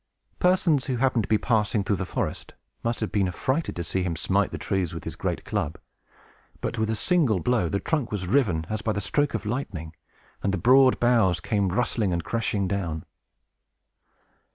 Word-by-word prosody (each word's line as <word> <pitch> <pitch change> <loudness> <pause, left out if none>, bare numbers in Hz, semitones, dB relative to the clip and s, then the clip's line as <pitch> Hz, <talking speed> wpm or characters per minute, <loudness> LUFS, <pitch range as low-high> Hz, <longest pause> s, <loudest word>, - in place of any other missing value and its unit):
Persons 175 -6 +3
who 130 - 0
happened 125 -3 +2
to - - -14
be 110 - +4
passing 105 -3 +1
through 100 0 0
the 95 - -3
forest - - -4 0.3
must 115 0 -1
have 110 - -2
been 100 -3 +2
affrighted 130 - -1
to 85 - -3
see 95 +3 -1
him 90 -2 -1
smite - - +1
the - - -5
trees 90 -4 -2
with 85 - -6
his - - -6
great - - -3
club. 75 - -2 0.9
With - - -1
but 110 -1 0
a 110 - +1
single 135 - +2
blow, 95 -2 +1
the 100 - 0
trunk 150 -2 -1
was 100 -3 -2
riven 95 - +2
as 110 0 -3
by 110 +1 0
the 100 - -1
stroke 145 +7 0
of 110 -1 -4
lightning, 95 - -4 0.5
and 100 - 0
the 95 - 0
broad 130 +7 +5
boughs 115 -8 +3
came 100 +1 0
rustling 110 -1 0
and 85 -1 -1
crashing 105 -3 -1
down. 85 -5 -3
105 Hz, 195 wpm, -26 LUFS, 95-125 Hz, 0.9 s, broad